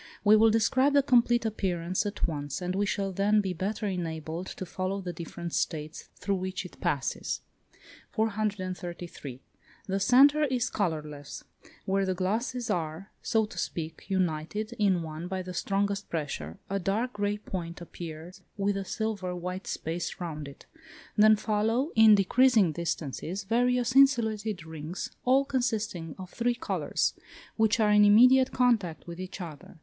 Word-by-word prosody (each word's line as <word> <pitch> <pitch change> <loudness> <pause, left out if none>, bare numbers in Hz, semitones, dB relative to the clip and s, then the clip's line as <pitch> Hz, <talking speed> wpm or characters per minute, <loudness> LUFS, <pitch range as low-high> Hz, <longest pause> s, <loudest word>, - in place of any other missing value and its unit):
We 210 +1 +7
will 220 +1 +6
describe 260 +6 +3
the 280 -1 +5
complete 240 -3 +3
appearance 185 -3 -1
at 205 -2 -1
once, 145 -3 -4
as 180 0 -2
we 200 +2 0
shall 195 -1 -1
then 200 +3 +3
be 190 -3 -1
better 205 +5 -3
enabled 165 -2 -3
to 185 - -6
follow 185 +2 -3
the 180 -2 -5
different 170 0 -7
states 155 0 -3
through 200 -1 -1
which 185 0 -4
it 180 - -12
passes. 140 -2 -1 0.7
433. 185 - -3 0.4
The 195 0 -1
centre 280 +7 +6
is 255 -4 -1
colourless; 150 -7 -3 0.4
where 195 +1 +1
the 185 - 0
glasses 225 +6 -1
are, 165 +3 -3
so 220 -1 +2
to 195 -5 -8
speak, 165 -1 -4
united 190 +4 -1
in 190 -5 +3
one 160 +2 -6
by 190 0 -3
the 180 0 -7
strongest 200 +2 -1
pressure, 135 - -4
a 195 0 -1
dark 215 +7 -1
grey 205 0 -1
point 175 -5 -6
appears 170 0 -9 0.2
with 200 0 0
a 195 - -2
silver 200 -4 -3
white 180 +2 -5
space 165 +2 -4
round 155 -4 -5
it: 140 - -13 0.5
then 215 0 +7
follow, 225 +7 0
in 220 -1 +8
decreasing 215 -1 +4
distances, 170 +3 -3
various 245 +3 +1
insulated 220 -8 +3
rings, 160 +2 -6
all 265 +2 +4
consisting 220 - -2
of 185 -1 -9
three 240 +1 0
colours, 235 - -1 0.4
which 220 0 +2
are 210 -1 +4
in 210 0 +6
immediate 250 +5 +6
contact 220 -11 +1
with 170 0 -8
each 185 +1 -6
other. 165 -1 -9
195 Hz, 155 wpm, -28 LUFS, 170-220 Hz, 0.7 s, in